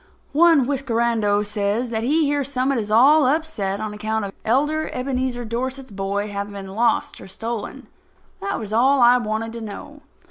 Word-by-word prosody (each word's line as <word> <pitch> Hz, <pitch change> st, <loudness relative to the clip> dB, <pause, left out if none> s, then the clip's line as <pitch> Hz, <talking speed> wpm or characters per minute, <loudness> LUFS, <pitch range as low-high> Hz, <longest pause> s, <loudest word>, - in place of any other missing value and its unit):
One 320 Hz, -3 st, +5 dB
whiskerando 235 Hz, -6 st, 0 dB
says 210 Hz, +3 st, -1 dB
that 220 Hz, -1 st, -1 dB
he 300 Hz, +7 st, +2 dB
hears 285 Hz, -1 st, -1 dB
Summit 260 Hz, -1 st, 0 dB
is 210 Hz, -2 st, -4 dB
all 270 Hz, +6 st, +5 dB
upset 260 Hz, -10 st, -1 dB
on 215 Hz, -1 st, -4 dB
account 215 Hz, 0 st, -2 dB
of 195 Hz, -, -7 dB
Elder 295 Hz, +7 st, +1 dB
Ebenezer 255 Hz, -1 st, -2 dB
Dorset's 255 Hz, +3 st, -4 dB
boy 200 Hz, +1 st, -2 dB
having 200 Hz, 0 st, -5 dB
been 195 Hz, -1 st, -8 dB
lost 230 Hz, +3 st, 0 dB
or -, -, -10 dB
stolen. 225 Hz, +3 st, -6 dB, 0.6 s
That 395 Hz, -, -2 dB
was 215 Hz, -1 st, -6 dB
all 265 Hz, +5 st, +4 dB
I 245 Hz, 0 st, +6 dB
wanted 225 Hz, -1 st, -3 dB
to 235 Hz, -, -7 dB
know. 225 Hz, +8 st, -9 dB
235 Hz, 170 wpm, -22 LUFS, 210-270 Hz, 0.6 s, I